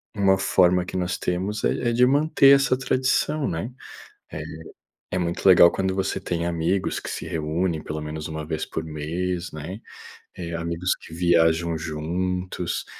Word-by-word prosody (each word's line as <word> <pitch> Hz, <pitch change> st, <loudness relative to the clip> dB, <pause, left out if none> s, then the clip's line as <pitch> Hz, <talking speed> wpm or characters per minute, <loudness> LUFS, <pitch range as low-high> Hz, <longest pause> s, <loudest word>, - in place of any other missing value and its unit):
uma 95 Hz, -2 st, +3 dB
forma 90 Hz, -1 st, +3 dB
que 90 Hz, -, -5 dB
nós 90 Hz, -1 st, -1 dB
temos 95 Hz, +4 st, -2 dB
é 120 Hz, -, +1 dB
é -, -, 0 dB
de 125 Hz, +2 st, +5 dB
manter 140 Hz, 0 st, +5 dB
essa 135 Hz, -2 st, +2 dB
tradição, 135 Hz, +3 st, 0 dB
né. 85 Hz, +7 st, -3 dB, 0.6 s
Eh, -, -, -5 dB, 0.7 s
é 90 Hz, -, -1 dB
muito 85 Hz, +1 st, -1 dB
legal 85 Hz, -2 st, +8 dB
quando 95 Hz, 0 st, -1 dB
você 95 Hz, 0 st, -1 dB
tem 85 Hz, -3 st, -3 dB
amigos 85 Hz, +3 st, 0 dB
que -, -, -7 dB
se -, -, -5 dB
reúnem 80 Hz, +1 st, -1 dB
pelo 75 Hz, 0 st, -5 dB
menos 75 Hz, 0 st, -5 dB
1 80 Hz, -1 st, -5 dB
vez 80 Hz, 0 st, -3 dB
por -, -, -4 dB
mês, 85 Hz, +4 st, -3 dB
né, 80 Hz, +7 st, -6 dB, 0.6 s
eh, 85 Hz, -1 st, -5 dB
amigos 85 Hz, +2 st, -1 dB
que -, -, -14 dB
viajam 85 Hz, -1 st, +2 dB
juntos, 90 Hz, +3 st, -3 dB
90 Hz, 160 wpm, -24 LUFS, 80-95 Hz, 0.7 s, legal